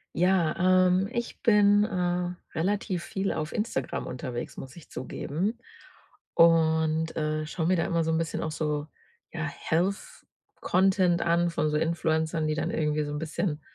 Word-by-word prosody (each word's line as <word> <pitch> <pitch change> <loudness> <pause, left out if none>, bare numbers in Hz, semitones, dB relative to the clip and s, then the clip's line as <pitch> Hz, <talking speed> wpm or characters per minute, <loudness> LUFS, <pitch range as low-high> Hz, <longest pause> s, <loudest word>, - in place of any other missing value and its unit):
Ja, 180 -2 +2 0.3
ähm, 185 +2 +2
ich 235 -1 -4
bin, 205 -3 +5
äh, 180 -2 -1 0.3
relativ 185 0 -1
viel 195 0 -2
auf 155 0 -3
Instagram 210 - -2
unterwegs, 125 -1 -5
muss 130 0 -9
ich 170 - -14
zugeben. 170 - -3 0.7
Und, 160 -1 +3
äh, 155 0 -1
schaue 160 +1 -2
mir 185 +1 +3
da 165 - +1
immer 170 -1 +1
so 160 - 0
'n 160 - +1
bisschen 165 0 -2
auch 160 - -3
so, 150 -1 -2 0.4
ja 160 -2 -3
Health 170 +6 -2 0.3
Content 185 -2 +2
an 170 0 +2
von 155 -2 0
so 150 - 0
Influencern, 160 0 0
die 155 - 0
dann 155 - -2
irgendwie 150 -1 0
so 145 - -5
'n 150 - -3
bisschen 160 0 -2
165 Hz, 160 wpm, -27 LUFS, 155-185 Hz, 0.7 s, bin